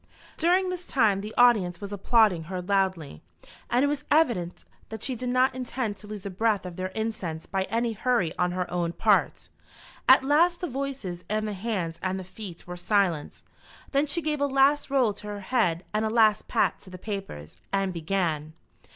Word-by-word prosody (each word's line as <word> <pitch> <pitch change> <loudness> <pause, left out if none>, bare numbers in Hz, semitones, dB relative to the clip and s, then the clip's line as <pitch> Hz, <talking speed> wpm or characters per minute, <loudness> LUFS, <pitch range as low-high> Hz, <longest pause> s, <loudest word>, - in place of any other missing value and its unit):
During 365 +3 +2
this 360 -1 -4
time 220 - +2
the 210 +2 -6
audience 210 -8 +4
was 200 0 -6
applauding 205 -4 +3
her 185 +2 -4
loudly, 185 - -1 0.5
and 250 +3 +3
it - - +2
was 290 0 -2
evident 235 - +1 0.2
that 220 -2 -7
she 260 - -1
did 250 +1 -4
not 255 +1 +3
intend 250 -4 -3
to 210 - -13
lose 205 -2 -7
a 200 - -4
breath 205 0 0
of 180 -1 -7
their 185 +1 -3
incense 200 -8 -3
by 190 0 -1
any 230 +3 -1
hurry 220 -7 0
on 180 0 0
her 180 0 -1
own 170 -1 -1
part. - - +2 0.6
At - - +8
last 335 +5 +3
the 355 - -3
voices 260 - -5
and 215 +1 -1
the 210 - -3
hands 190 -5 -3
and 190 0 -2
the - - -6
feet 185 -1 -9
were 180 0 -7
silent. 175 -4 0 0.5
Then 280 +2 +2
she 310 +3 -1
gave 300 -1 -1
a 285 - +3
last 275 +2 +3
roll 260 -6 +2
to 210 +1 -10
her 205 -1 -5
head 190 -6 0
and 215 +1 +1
a 220 - 0
last 220 -2 +3
pat - - +1
to 190 - -13
the 185 - -9
papers, 190 - -7
and 195 -1 0
began. 160 -3 -2
210 Hz, 195 wpm, -26 LUFS, 180-255 Hz, 0.6 s, At